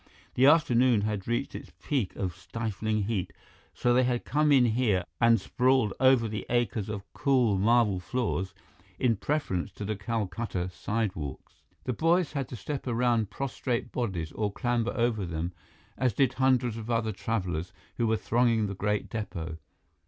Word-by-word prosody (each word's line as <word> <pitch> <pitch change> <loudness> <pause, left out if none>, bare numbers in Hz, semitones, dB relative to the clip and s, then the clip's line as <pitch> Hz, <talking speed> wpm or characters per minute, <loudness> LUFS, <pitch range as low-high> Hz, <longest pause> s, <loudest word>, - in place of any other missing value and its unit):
The 130 +2 +5
afternoon 125 -7 +5
had 105 -2 -2
reached 120 +3 -1
its - - -8
peak 130 -10 -1
of 90 -4 -3
stifling 110 +1 -2
heat, 100 -3 -2 0.4
so 120 - +2
they 125 - +5
had 125 -1 0
come 150 +2 +2
in 130 -3 +6
here 110 -5 +2 0.2
and 115 -1 +5
sprawled 125 +1 +2
over 130 -3 +5
the 105 -2 -4
acres 115 -4 0
of 105 -2 -4
cool 125 -9 +2
marble 110 -2 +3
floors 95 -3 -2 0.4
in 120 +1 +2
preference 105 - -2
to 105 - -6
the 105 +1 -2
Calcutta 95 -2 -3
sidewalks. 90 - -4 0.2
The 125 - -1
boys 165 +6 +2
had 135 -4 -2
to - - -6
step 135 +5 -5
around 120 -3 +1
prostrate 130 -2 -3
bodies 95 -10 -2
or 105 -2 -2
clamber 120 +2 -1
over 115 -4 +1
them, 85 0 -3 0.5
as 130 -3 +2
did 135 +5 +2
hundreds 125 -3 +2
of 115 0 -7
other 115 -2 +1
travelers 90 -5 -2 0.3
who 120 - +1
were 110 0 +2
thronging 115 0 +2
the 100 - -3
great 105 +1 -1
depot. 85 -7 -5
115 Hz, 160 wpm, -28 LUFS, 100-125 Hz, 0.5 s, in